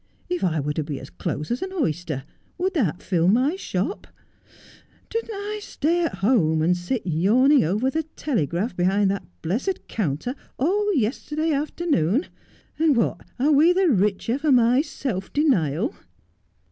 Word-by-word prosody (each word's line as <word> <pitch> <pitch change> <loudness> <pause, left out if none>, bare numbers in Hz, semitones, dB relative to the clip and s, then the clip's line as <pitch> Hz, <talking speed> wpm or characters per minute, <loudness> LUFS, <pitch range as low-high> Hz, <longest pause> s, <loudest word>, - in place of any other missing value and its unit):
If 360 0 -2
I 160 -4 +1
were 150 +1 -1
to 155 - -2
be 145 -2 -5
as 135 - -11
close 150 +7 -4
as 240 - -1
an 375 - -4
oyster, 170 - -2 0.3
would 370 +1 -1
that 210 - 0
fill 175 -2 +1
my 255 - +3
shop? 385 - -3 1.0
Didn't 455 0 -2
I 415 +1 -4
stay 345 -2 0
at 325 - -1
home 170 -6 +2
and 175 +2 +3
sit 180 +7 -3
yawning 225 - +4
over 210 +11 0
the 320 - 0
Telegraph 195 - -1
behind 190 +3 +2
that 200 - -4 0.2
blessed 245 - -2
counter 190 - -2 0.2
all 410 +9 +1
yesterday 300 +6 -1
afternoon 290 - 0 0.5
1 - - -31
and 315 -3 +4
what 230 - 0 0.2
are 280 +5 +2
we 310 +5 +6
the 375 -1 +3
richer 210 +2 +1
for 300 0 +1
my 245 +1 +5
self 255 - -4
denial 220 - +1
240 Hz, 160 wpm, -24 LUFS, -, 1.0 s, we